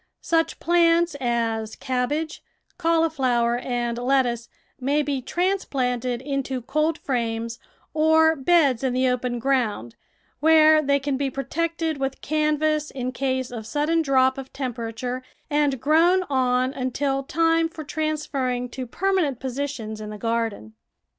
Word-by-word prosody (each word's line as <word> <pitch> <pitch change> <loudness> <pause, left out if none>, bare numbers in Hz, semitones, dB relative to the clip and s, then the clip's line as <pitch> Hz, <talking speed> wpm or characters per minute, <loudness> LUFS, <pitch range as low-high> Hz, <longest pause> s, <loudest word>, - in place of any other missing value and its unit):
Such 325 -1 +1
plants 340 -1 +3
as 230 -3 -1
cabbage, 280 +5 -2 0.4
cauli 330 -1 +2
flower, 240 -5 +1
and 240 -1 -2
lettuce 245 -2 +1 0.3
may 285 +3 +1
be 280 -2 -2
transplanted 255 -8 -1
into 270 -3 -3
cold 305 +5 0
frames 230 -4 -2 0.3
or 320 +1 +4
beds 280 -4 +3
in 260 -2 +1
the 255 +1 +2
open 250 -1 -1
ground, 235 - -1 0.4
where 310 +1 +6
they 280 -1 +2
can 280 -1 -2
be 275 0 -1
protected 320 +4 -2
with 270 0 -2
canvas 305 0 0
in 255 -1 -4
case 260 -1 -2
of 225 -3 -7
sudden 305 +5 +1
drop 265 -2 +3
of 265 -1 -9
temperature, 245 -1 -4 0.3
and 290 -3 +2
grown 335 +7 +4
on 255 0 +2
until 270 +1 -1
time 330 +3 +2
for 320 -1 -8
trans 310 0 -2
ferring 250 -2 -2
to 255 0 -5
permanent 350 -4 0
positions 260 -5 -4
in 210 - -6
the 210 - -7
garden. 225 - -2
270 Hz, 135 wpm, -24 LUFS, 245-310 Hz, 0.4 s, where